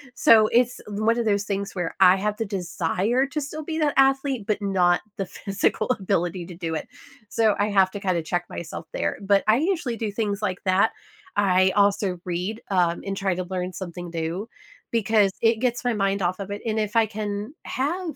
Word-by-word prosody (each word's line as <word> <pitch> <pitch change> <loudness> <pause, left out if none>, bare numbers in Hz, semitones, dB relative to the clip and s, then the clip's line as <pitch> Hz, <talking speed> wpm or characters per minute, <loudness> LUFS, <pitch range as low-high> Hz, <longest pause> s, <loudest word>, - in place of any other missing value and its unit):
So, 220 -3 +6
it's 245 +2 +2
one 215 +3 +1
of 235 - 0
those 205 -2 +2
things 200 -1 -3
where 175 -3 -3
I 185 0 +7
have 210 +2 -1
the 225 - -2
desire 200 +5 0
to 300 - -3
still 305 +2 -6
be 320 +1 -3
that 300 -2 +2
athlete, 270 -3 +2
but 210 0 -1
not 180 -3 +2 0.2
the 195 - -2
physical 195 +1 -1
ability 185 -5 -1
to 180 - -9
do 165 -2 -3
it, - - -4 0.4
so 220 -3 +2
I 205 +1 +1
have 195 -2 +4
to 205 - -5
kinda 185 -4 0
check 175 +2 -2
myself 170 0 -7
there. - - -2
But 200 0 +3
I 215 - +6
usually 315 -5 0
do 225 -2 -3
things 205 -1 -2
like 190 -3 -2
that. 190 +4 +3 0.5
I 185 -2 +4
also 200 -2 +2
read, 180 +5 -3
um, 175 -3 +1
and 195 0 -2
try 195 -1 0
to 185 - -2
learn 180 0 -4
something 175 -2 -7
new 170 +5 -3 0.4
because 215 -3 +3
it 230 0 +4
gets 245 0 0
my 245 -1 +1
mind 195 -1 0
off 185 +1 0
of 200 0 -6
it. 205 - -5
And 220 -1 0
if 210 0 -2
I 225 -1 +4
can 210 +4 -4
have 325 +5 -2
200 Hz, 205 wpm, -24 LUFS, 185-225 Hz, 0.5 s, I